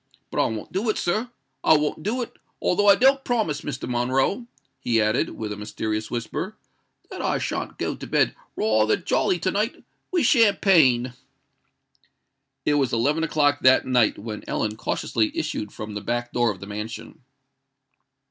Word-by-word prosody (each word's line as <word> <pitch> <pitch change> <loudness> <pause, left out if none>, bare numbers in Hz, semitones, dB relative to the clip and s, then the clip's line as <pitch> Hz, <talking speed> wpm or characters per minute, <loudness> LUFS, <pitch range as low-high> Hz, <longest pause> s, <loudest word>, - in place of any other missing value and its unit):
But - - -2
I - - +1
won't 110 -1 -6
do 205 +5 0
it, 215 - 0
sir—I 175 - 0
won't 150 +1 -2
do 235 +8 -1
it; - - -10 0.2
although 205 +3 +1
I 200 - +9
don't 270 +1 +4
promise, 220 - 0
Mr. 135 -3 -5
Monroe," 130 - 0 0.3
he 115 -2 +1
added, 110 0 +1
in 105 -2 -5
a - - -6
mysterious 110 +1 -4
whisper, 120 -2 -4 0.5
"that - - -6
I - - 0
shan't - - -4
go - - -2
to - - -9
bed - - +2 0.2
rayther 110 0 +2
jolly 190 +2 +1
to 185 +2 -1
night 215 +4 -2 0.3
with 355 -3 +2
champagne." 175 - +4 1.5
It 150 - +3
was 140 -3 +1
eleven 145 +8 +1
o'clock 145 -2 +2
that 130 0 +5
night 125 -4 +2
when 105 0 -7
Ellen 105 0 -1
cautiously 110 0 -1
issued 130 -10 -3
from 110 -1 -7
the 105 - -4
back 120 +3 -2
door 120 -1 +2
of 95 -4 -5
the - - -6
mansion. 105 +2 -7
130 Hz, 165 wpm, -24 LUFS, -, 1.5 s, I